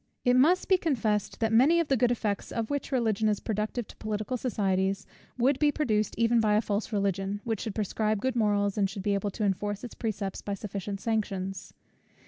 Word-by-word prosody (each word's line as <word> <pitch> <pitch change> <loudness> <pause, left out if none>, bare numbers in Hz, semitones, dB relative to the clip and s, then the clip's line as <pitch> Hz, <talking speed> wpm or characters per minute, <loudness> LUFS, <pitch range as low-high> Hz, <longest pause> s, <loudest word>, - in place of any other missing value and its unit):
It 245 0 +5
must 325 +9 +4
be 375 -2 +4
confessed, 220 - 0
that 225 0 +1
many 285 +9 +5
of 335 - +1
the 275 - +3
good 245 -1 +3
effects, 215 -4 -2
of 230 +1 -3
which 285 0 -2
Religion 220 -4 +1
is 210 - 0
productive 215 +2 -2
to - - -13
political 215 +3 -3
societies, 195 -5 0 0.3
would 260 +3 +2
be 295 -1 +4
produced 215 -9 0
even 230 +1 +3
by 215 -2 +3
a 210 - +4
false 210 0 -2
Religion, 200 -1 -1
which 225 -3 -2
should 220 -4 -4
prescribe 215 0 0
good 260 +3 -1
morals, 205 -2 +1
and 195 -1 +2
should 195 0 -6
be 205 0 +1
able 200 +1 0
to 210 - -4
enforce 205 +1 -1
its 245 - -7
precepts 205 -4 -3
by 200 - -3
sufficient 200 0 -5
sanctions. 195 -4 -3
215 Hz, 205 wpm, -28 LUFS, 200-240 Hz, 0.3 s, It